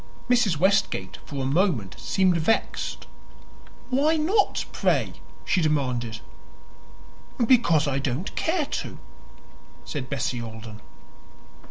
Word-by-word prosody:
Mrs. 230 -10 +3
Westgate 185 - +1
for 140 -2 -4
a - - -1
moment 140 - +1
seemed 185 -2 +2
vexed. 170 +7 0 0.9
"Why 300 +5 +3
not, 380 +7 +2
pray?" - - +1 0.3
she 185 - +2
demanded. 125 -8 0 1.2
"Because 170 - +4
I 135 -1 0
don't 135 +6 -3
care 325 -2 0
to," - - -5 0.9
said 135 -4 -5
Bessie 125 -2 -2
Alden. 110 -1 -8
155 Hz, 105 wpm, -25 LUFS, -, 1.2 s, Because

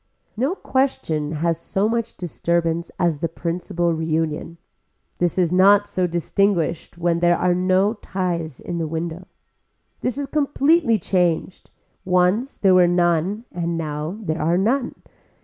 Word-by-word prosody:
No 265 - 0
question 165 - -1
has 165 +1 0
so 195 +4 0
much 230 0 -2
disturbance 170 -1 -1
as 170 -5 +1
the 165 +1 -1
principal 170 +1 -2
reunion. 160 0 -2 0.6
This 175 0 0
is 180 -2 +2
not 200 +2 +6
so 185 -3 -1
distinguished 170 -1 0
when 170 0 +1
there 175 0 +3
are 180 -1 +2
no 185 +3 +2
ties 175 - -3
in 170 - -5
the 160 - -1
window. 165 +3 -5 0.7
This 250 +1 -2
is 285 - -2
completely 290 -2 +2
changed, 180 -1 -1 0.3
once 185 +8 +1
there 190 -2 +4
were 180 -1 +6
none 175 +5 +1
and 170 -1 -2
now 155 +3 -4
there 160 -3 -2
are 165 +3 +2
none. 245 +7 0
175 Hz, 140 wpm, -22 LUFS, 165-200 Hz, 0.7 s, not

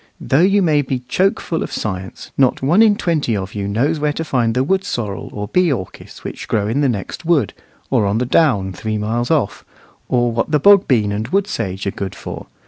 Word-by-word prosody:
Though 135 +4 +2
you 195 +2 +4
may 155 -4 +3
be 135 -1 -2
choke 195 +1 +1
full 165 - -3
of - - -4
science, 95 -3 -5
not 130 -1 +2
one 170 +10 +4
in 215 -2 +5
twenty 155 - 0
of 95 -1 -5
you 100 -1 -3
knows 135 +10 0
where 150 0 +1
to 165 - -3
find 120 -6 0
the 130 - +2
wood 190 +6 +1
sorrel, 110 - -4
or 105 0 -5
bee 180 - +2
orchis, 95 -9 -6
which - - -7
grow 105 -2 0
in 125 +7 0
the 140 - +3
next 105 - -4
wood, 165 -4 +1 0.4
or 115 -6 +2
on 100 +2 0
the 125 - 0
down 120 - +2
three 110 +3 -3
miles 115 +3 -1
off, 155 -11 0 0.5
or 120 -1 +2
what 115 +4 -1
the 150 -1 +2
bog 200 +4 +6
bean 110 -6 +2
and 105 +2 -3
wood 195 +8 +1
sage 100 - -4
are 100 - 0
good 95 -1 -5
for. - - -8
125 Hz, 225 wpm, -18 LUFS, 105-160 Hz, 0.5 s, bog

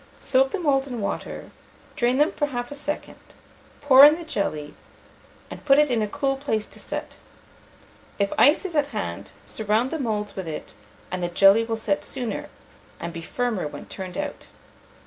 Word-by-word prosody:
Soak 265 0 +2
the 400 - -3
moulds 280 -5 +1
in 245 -3 -5
water, 200 - -4 0.4
drain 245 +1 +2
them 300 +5 +3
for 295 -6 -1
half 245 -2 -4
a - - -4
second, 295 +1 -5 0.6
pour 275 -2 +8
in 300 +1 +9
the 340 - -7
jelly, 155 - -3 0.8
and - - -9
put 275 -1 +5
it 295 -2 +4
in 235 -2 +2
a 210 - 0
cool 275 +3 -1
place 220 -6 -1
to - - -12
set. - - -6 1.0
If 200 -1 0
ice 295 +7 +5
is 350 -4 -4
at 290 -2 +2
hand, 100 - -5
surround 215 - 0
the 320 - -2
moulds 210 -5 -2
with 190 -3 -5
it, 155 - -6 0.4
and 185 0 -3
the 175 - 0
jelly 195 +5 +6
will 225 0 -2
set 205 -3 -1
sooner, 245 -4 -4 0.5
and 170 0 -5
be 165 - -6
firmer 225 -1 -2
when - - -9
turned 185 -2 -7
out. 295 -1 -5
245 Hz, 185 wpm, -24 LUFS, 200-285 Hz, 1.0 s, in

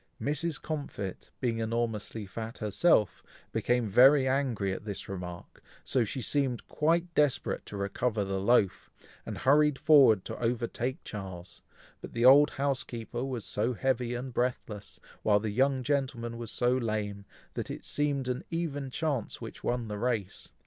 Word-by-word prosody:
Mrs. 150 +1 -1
Comfit, 140 - -5
being 115 -3 -1
enormously 115 -1 -2
fat 110 +4 -7
herself, 105 - +2 0.3
became 120 -1 +1
very 130 +6 +6
angry 130 -8 0
at - - -6
this 105 -2 -5
remark, 90 -2 -8 0.2
so 130 -3 +1
she 120 +4 -4
seemed 135 -4 0
quite 170 +3 +1
desperate 145 -5 +1
to 105 - -6
recover 105 +2 -1
the 95 -1 -2
loaf, 100 -3 +2 0.4
and - - -4
hurried 150 +1 +4
forward 135 -10 +6
to - - -6
overtake 120 +2 -2
Charles, 95 -4 -8 0.4
but - - -9
the 120 +1 +1
old 145 +3 +8
housekeeper 125 -3 -3
was 130 -5 -4
so 115 +4 -1
heavy 125 -1 0
and 125 +1 -5
breathless, 110 -5 -3 0.2
while 105 -1 +4
the 105 0 -3
young 130 +3 +2
gentleman 130 -4 -1
was 115 -2 -6
so 125 +2 +1
lame, 105 -4 -2 0.3
that - - -4
it - - -6
seemed 145 -3 0
an 125 0 -2
even 145 -5 -3
chance 140 -4 -2
which - - -9
won 120 -2 -1
the 105 -1 -5
race. 110 -5 -2
120 Hz, 155 wpm, -30 LUFS, 105-135 Hz, 0.4 s, old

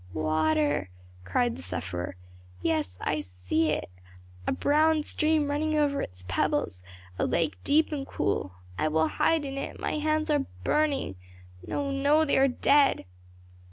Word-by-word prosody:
"Water!" 155 -7 +1 0.4
cried 115 +5 +1
the - - -9
sufferer. 90 0 -4 0.5
"Yes, 155 - 0
I 150 - 0
see 90 - -1
it 150 - -1 0.6
a - - +2
brown 310 +1 +3
stream 305 0 +1
running 310 +1 0
over 285 -2 +2
its 90 0 -7
pebbles 90 0 0 0.4
a - - +2
lake 165 -2 -1
deep 310 +3 +3
and 280 -3 -3
cool. 95 -2 -2 0.2
I 155 - +2
will 160 +1 +2
hide 320 -3 +1
in 275 0 -4
it, - - -6
my 305 - -2
hands 310 +1 0
are 290 -2 +1 0.2
burning 290 - 0 0.5
no, 280 -1 -2
no, 285 +3 +3
they 280 - +2
are 270 - +5
dead." 275 - +3
270 Hz, 150 wpm, -28 LUFS, -, 0.6 s, are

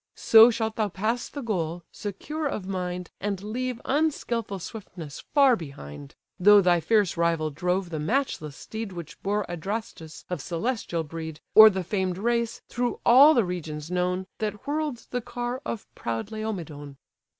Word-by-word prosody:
So 225 +1 +8
shalt 220 -2 -2
thou 215 -2 +1
pass 220 +6 -2
the 285 - -6
goal, 175 -6 -2
secure 295 +10 -4
of 210 -8 -4
mind, 180 -1 -4
And 200 -1 -2
leave 245 +3 -3
unskilful 245 -8 0
swiftness 175 -6 -8
far 275 -4 +6
behind: 75 - -9 0.2
Though 205 +3 +8
thy 180 -3 +4
fierce 200 +1 +2
rival 165 -2 +1
drove 180 +4 -1
the 155 - -3
matchless 155 - -1
steed 220 -3 -6
Which 170 -3 -9
bore 205 0 0
Adrastus, 175 -2 -6
of 180 - -4
celestial 175 -2 -2
breed; 160 0 -7
Or 220 0 +11
the 190 -2 -3
famed 185 -1 -1
race, 235 +2 0
through 245 0 -2
all 280 +6 +8
the 235 - +3
regions 160 -3 -5
known, 180 +1 0
That 210 -1 -3
whirl'd 295 -4 -2
the 245 - -1
car 245 +2 -4
of 225 - -4
proud 115 - -4
Laomedon." 165 -11 -5
195 Hz, 155 wpm, -26 LUFS, 170-230 Hz, 0.2 s, Or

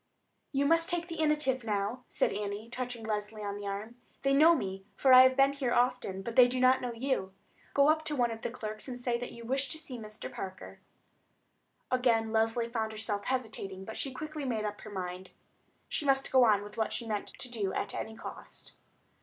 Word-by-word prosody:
"You 280 0 +1
must 330 +2 +3
take 350 -1 -1
the 330 -1 -5
initiative 300 -5 +2
now," 210 +3 -2
said - - +1
Annie, 210 +2 -4
touching 245 -2 -4
Leslie 210 0 -3
on 200 0 -3
the 205 0 -6
arm. 210 +4 -5 0.3
"They 275 0 +3
know 315 +4 +7
me, 190 -7 -4
for 265 +4 +5
I 255 - +11
have 260 0 +5
been 275 +1 +5
here 265 -4 -1
often; 245 -6 +1
but 230 +2 -5
they 250 -1 +8
do 255 +1 -2
not 255 +1 +5
know 245 - -2
you. 230 -6 -2 0.4
Go 280 0 +6
up 310 +1 +3
to 300 - -1
one 240 -3 +2
of 225 0 -6
the - - -2
clerks 215 -1 -6
and 250 -1 -6
say 245 -1 -1
that 245 - -5
you 235 0 -10
wish 270 +2 0
to 315 - -4
see 270 -6 -7
Mr. 215 0 -8
Parker." 190 -1 -7 1.1
Again 235 -3 +2
Leslie 225 +1 +1
found 225 -2 -2
herself 215 -2 -3
hesitating, 220 -7 -3
but - - -9
then - - -8
she 275 - 0
quickly 305 +3 -6
made 225 -5 -1
up 210 0 -4
her 215 - -9
mind. 185 -1 -6 0.5
She - - -2
must 270 -1 +2
go 260 -2 +6
on 205 -3 +4
with 205 +1 -11
what 220 - 0
she 235 - -2
meant 215 -2 -2
to - - -4
do 215 -6 -2
at - - -3
any 220 0 -5
cost. - - -10
235 Hz, 220 wpm, -31 LUFS, 215-265 Hz, 1.1 s, I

